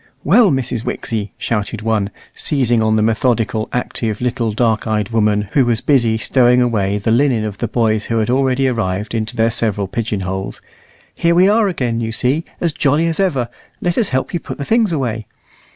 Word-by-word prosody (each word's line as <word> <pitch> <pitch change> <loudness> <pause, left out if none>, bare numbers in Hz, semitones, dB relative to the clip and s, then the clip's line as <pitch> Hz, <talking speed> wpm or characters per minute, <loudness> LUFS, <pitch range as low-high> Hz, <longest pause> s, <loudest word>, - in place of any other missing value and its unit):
"Well, 235 -5 +5
Mrs. 130 -5 -2
Wixie," 105 -5 -3
shouted 105 -1 -3
one, 110 -3 0 0.2
seizing 120 -6 +1
on 110 0 +2
the 110 - +2
methodical, 115 -1 0
active, 115 -3 -3
little 120 -2 -1
dark 110 0 0
eyed 105 -2 -1
woman, 105 -3 +1
who 140 - +3
was 120 -2 +2
busy 120 -6 +2
stowing 125 +2 +3
away 105 -5 +1
the 105 +2 -1
linen 120 -2 +2
of 105 -2 -6
the 120 - -1
boys 110 -1 0
who 115 - -1
had 110 -1 +1
already 135 0 +2
arrived 105 -4 -2
into 110 -1 -2
their 115 +1 +2
several 105 -4 -1
pigeon 110 -1 -3
holes, 95 +1 -4 0.5
"here 170 0 +1
we 180 +2 +5
are 215 +1 +3
again, 125 -10 -1
you 110 -1 -2
see, 130 +8 0
as 170 -3 -1
jolly 150 +2 +1
as 165 +1 -1
ever. 145 -11 +1 0.3
Let 175 -1 -1
us 230 - +1
help 130 +6 -2
you 175 - 0
put - - -8
the 140 - -4
things 225 -1 +2
away." 115 -8 -2
115 Hz, 195 wpm, -17 LUFS, 110-135 Hz, 0.5 s, Well